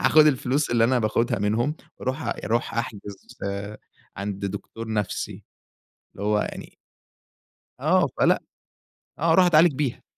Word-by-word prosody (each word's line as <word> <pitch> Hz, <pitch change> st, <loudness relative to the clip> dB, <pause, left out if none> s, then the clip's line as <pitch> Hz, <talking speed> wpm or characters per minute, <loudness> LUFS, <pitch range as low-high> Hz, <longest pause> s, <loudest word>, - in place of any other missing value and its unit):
هاخد 155 Hz, 0 st, +6 dB
الفلوس 140 Hz, 0 st, +1 dB
اللي 115 Hz, -1 st, +4 dB
أنا 125 Hz, +2 st, +3 dB
باخدها 115 Hz, 0 st, +1 dB
منهُم، 115 Hz, +9 st, 0 dB, 0.2 s
وأرُوح 130 Hz, +4 st, -3 dB
أرُوح 115 Hz, -1 st, -2 dB
أحجز 105 Hz, -4 st, -4 dB, 1.0 s
عند 100 Hz, 0 st, -4 dB
دكتور 105 Hz, +3 st, -7 dB
نَفْسي، 105 Hz, -2 st, -3 dB, 0.7 s
اللي 100 Hz, -, -7 dB
هو 105 Hz, 0 st, +2 dB
يعني. -, -, -7 dB, 1.0 s
آه، -, -, +3 dB
فلأ، -, -, +4 dB, 0.8 s
آه، -, -, +3 dB
أرُوح 185 Hz, -1 st, +6 dB
أتعالج 165 Hz, -1 st, +6 dB
بيها. 135 Hz, -3 st, -2 dB
115 Hz, 125 wpm, -25 LUFS, 105-140 Hz, 1.0 s, هاخد